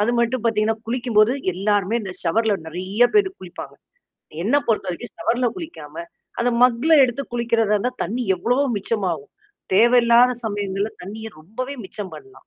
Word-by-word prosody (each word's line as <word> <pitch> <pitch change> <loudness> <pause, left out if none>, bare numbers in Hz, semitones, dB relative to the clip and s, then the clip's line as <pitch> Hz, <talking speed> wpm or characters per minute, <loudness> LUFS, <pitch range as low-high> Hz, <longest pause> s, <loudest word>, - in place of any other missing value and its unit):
அது 210 +3 +2
மட்டும் 235 0 +1
பாத்தீங்கன்னா, 220 -1 +1
குளிக்கும்போது, 235 -1 +2 0.2
எல்லாருமே 205 +3 +1
இந்த 190 -3 -6
ஷவர்ல 210 +5 +2
நெறையா 185 +8 0
பேரு 400 -2 +4
குளிப்பாங்க. 180 -2 -9 0.7
என்ன 235 +9 +2
பொறுத்தவரைக்கும் 210 0 -2
ஷவர்ல 240 +3 +1
குளிக்காம, 160 - -9 0.4
அந்த 245 - +2
மக்ல 250 +6 +4
எடுத்து 245 +2 -2
குளிக்கிறதா 230 -3 +1
இருந்தா 250 +5 -1
தண்ணி 245 +4 -3
எவ்வளவோ 245 +9 +1
மிச்சமாகும். 190 -8 -2 0.4
தேவையில்லாத 240 +3 +5
சமயங்கள்ல 205 0 -2
தண்ணிய 220 +4 -7
ரொம்பவே 255 - -6
மிச்சம் 190 +1 -7
பண்ணலாம். 400 0 -14
225 Hz, 135 wpm, -22 LUFS, 200-245 Hz, 0.7 s, தேவையில்லாத